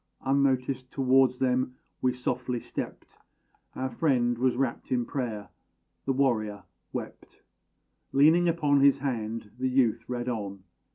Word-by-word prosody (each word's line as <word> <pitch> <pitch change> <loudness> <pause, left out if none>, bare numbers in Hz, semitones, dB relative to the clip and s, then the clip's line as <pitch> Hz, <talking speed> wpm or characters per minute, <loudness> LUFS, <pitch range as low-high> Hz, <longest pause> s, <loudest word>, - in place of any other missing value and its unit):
Unnoticed, 130 -1 +1
towards 130 -1 +3
them 130 -1 0 0.3
we 130 - +3
softly 125 0 -2
stept. - - -7 0.6
Our 130 0 -3
friend 120 -3 +2
was 125 +1 +1
rapt 130 -3 -2
in 120 -2 +1
prayer; 115 -6 -4 0.6
the 135 - +1
warrior 110 -7 0 0.3
wept, - - -8 0.7
Leaning 160 +5 +5
upon 150 -4 +2
his 140 0 +6
hand; 115 -6 -3
the 130 0 +1
youth 120 -3 +2
read 120 0 -3
on. 100 -5 -4
125 Hz, 125 wpm, -28 LUFS, 120-135 Hz, 0.7 s, his